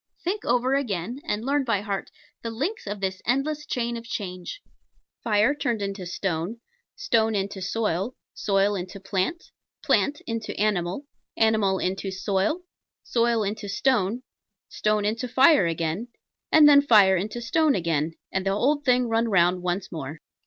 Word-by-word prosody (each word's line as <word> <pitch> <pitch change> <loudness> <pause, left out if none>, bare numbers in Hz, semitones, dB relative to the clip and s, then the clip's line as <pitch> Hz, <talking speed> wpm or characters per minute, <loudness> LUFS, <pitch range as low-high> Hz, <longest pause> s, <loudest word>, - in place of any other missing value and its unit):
Think 390 +4 -2
over 250 +2 +2
again, 240 -2 -2
and 210 -1 -2
learn 285 +1 +1
by 225 -6 0
heart, 200 -2 -4 0.3
the 230 - -4
links 280 - -3
of 205 0 -4
this 190 -1 -2
endless 295 +5 -1
chain 235 -3 -2
of 230 - -6
change: 185 - -5 0.6
Fire 215 +4 +3
turned 240 -7 -2
into 195 -2 -4
Stone 175 +4 -3 0.4
Stone 225 - +1
into 195 0 -3
Soil 200 +2 -1 0.2
Soil 200 0 +1
into 190 +1 -5
Plant 195 - -2 0.3
Plant 290 +1 +2
into 230 -1 -4
Animal 200 +3 0 0.3
Animal 220 -4 +3
into 190 +2 -2
Soil 195 - -1 0.4
Soil 235 -2 +1
into 205 0 -4
Stone 230 +1 +1 0.5
Stone 210 -1 0
into 225 +4 -1
Fire 260 - +5
again 165 +6 -2 0.4
and 305 -1 +8
then 285 -1 +8
Fire 210 -8 +6
into 210 +6 -3
Stone 295 +6 +2
again, 165 -3 -1 0.2
and 190 - -1
the 195 - 0
old 270 +9 +1
thing 250 -2 +3
run 225 +1 +1
round 180 -3 +3
once 180 +1 -2
more. 155 -1 -6
215 Hz, 150 wpm, -25 LUFS, 190-245 Hz, 0.6 s, and